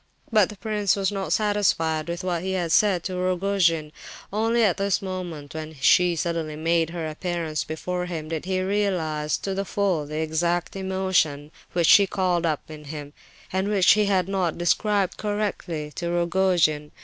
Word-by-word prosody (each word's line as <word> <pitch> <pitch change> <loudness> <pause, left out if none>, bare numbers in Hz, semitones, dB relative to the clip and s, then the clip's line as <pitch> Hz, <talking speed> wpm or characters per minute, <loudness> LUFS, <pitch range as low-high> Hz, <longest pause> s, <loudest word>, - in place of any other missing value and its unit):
But 215 -4 +4
the 210 - -10
prince 210 -2 0
was 195 0 0
not 195 -1 -3
satisfied 165 -7 +1
with 170 +2 -4
what 175 -2 -1
he 190 +1 -2
had 175 -3 -1
said 190 -4 +3
to 185 -1 -4
Rogojin. 180 -4 +1 0.4
Only 225 +2 +2
at 195 -5 +3
this 200 -1 +1
moment, 175 -6 -6
when 155 0 -6
she 175 +5 +4
suddenly 165 -2 -2
made 165 +1 +1
her 165 -2 -4
appearance 160 -1 -3
before 180 +3 -4
him, 160 -3 -5
did 165 0 -4
he 185 0 0
realize 180 -7 0
to 195 - -4
the 195 +1 -1
full 190 -7 -1
the 150 +1 -5
exact 170 +3 -1
emotion 185 -6 0 0.2
which 175 -1 +2
she 200 +4 +7
called 180 -3 0
up 155 -3 -1
in 155 -1 -10
him, 145 -1 -7 0.4
and 190 +1 0
which 200 -3 +4
he 210 0 +4
had 190 -3 +2
not 190 -4 -1
described 195 +3 +1
correctly 195 -7 -3
to 170 -2 -2
Rogojin. 170 -3 +1
175 Hz, 175 wpm, -24 LUFS, 160-195 Hz, 0.4 s, she